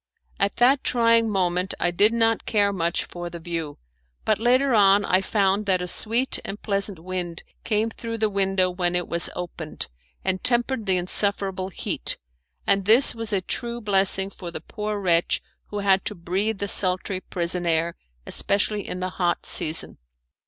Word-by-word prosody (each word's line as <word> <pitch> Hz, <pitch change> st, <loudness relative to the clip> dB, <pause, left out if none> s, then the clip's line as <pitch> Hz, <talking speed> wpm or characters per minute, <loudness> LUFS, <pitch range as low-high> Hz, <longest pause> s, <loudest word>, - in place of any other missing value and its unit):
At 200 Hz, 0 st, +1 dB
that 260 Hz, +3 st, +4 dB
trying 230 Hz, -1 st, +3 dB
moment 185 Hz, -1 st, 0 dB
I 175 Hz, -, +1 dB
did 205 Hz, +5 st, +4 dB
not 225 Hz, -1 st, +1 dB
care 205 Hz, -2 st, +2 dB
much 170 Hz, -2 st, -1 dB
for 175 Hz, 0 st, -7 dB
the 170 Hz, -, -8 dB
view; 165 Hz, -3 st, -5 dB, 0.5 s
but 215 Hz, -2 st, +2 dB
later 255 Hz, +3 st, +3 dB
on 200 Hz, -1 st, +5 dB
I 185 Hz, +1 st, +3 dB
found 200 Hz, 0 st, +1 dB
that 185 Hz, -2 st, +3 dB
a 180 Hz, -, -4 dB
sweet 230 Hz, +8 st, +1 dB
and 200 Hz, +2 st, -6 dB
pleasant 200 Hz, -2 st, -1 dB
wind 175 Hz, 0 st, -5 dB, 0.2 s
came 220 Hz, +1 st, 0 dB
through 230 Hz, 0 st, -5 dB
the 220 Hz, -1 st, +2 dB
window 195 Hz, -2 st, +1 dB
when 180 Hz, -1 st, -1 dB
it 175 Hz, -1 st, 0 dB
was 170 Hz, 0 st, +2 dB
opened, 170 Hz, -3 st, -6 dB, 0.4 s
and 185 Hz, -1 st, 0 dB
tempered 240 Hz, -2 st, +1 dB
the 185 Hz, -1 st, +2 dB
insufferable 190 Hz, +1 st, +1 dB
heat; 185 Hz, -, -3 dB, 0.5 s
and 195 Hz, -1 st, +2 dB
this 230 Hz, +6 st, +5 dB
was 225 Hz, -1 st, -5 dB
a 195 Hz, -2 st, +1 dB
true 235 Hz, +5 st, -4 dB
blessing 195 Hz, -2 st, +3 dB
for 180 Hz, -2 st, -8 dB
the 170 Hz, -, -6 dB
poor 210 Hz, -1 st, -4 dB
wretch 175 Hz, -3 st, +2 dB, 0.3 s
who 205 Hz, -, -6 dB
had 195 Hz, -1 st, +4 dB
to 210 Hz, -, -3 dB
breathe 195 Hz, +5 st, -2 dB
the 200 Hz, -, -3 dB
sultry 185 Hz, -1 st, +2 dB
prison 175 Hz, 0 st, -2 dB
air, 165 Hz, +1 st, +1 dB, 0.3 s
especially 205 Hz, +1 st, -1 dB
in 180 Hz, -, -5 dB
the 185 Hz, -, -1 dB
hot 175 Hz, -1 st, 0 dB
season. 155 Hz, +1 st, -1 dB
195 Hz, 175 wpm, -24 LUFS, 180-215 Hz, 0.5 s, on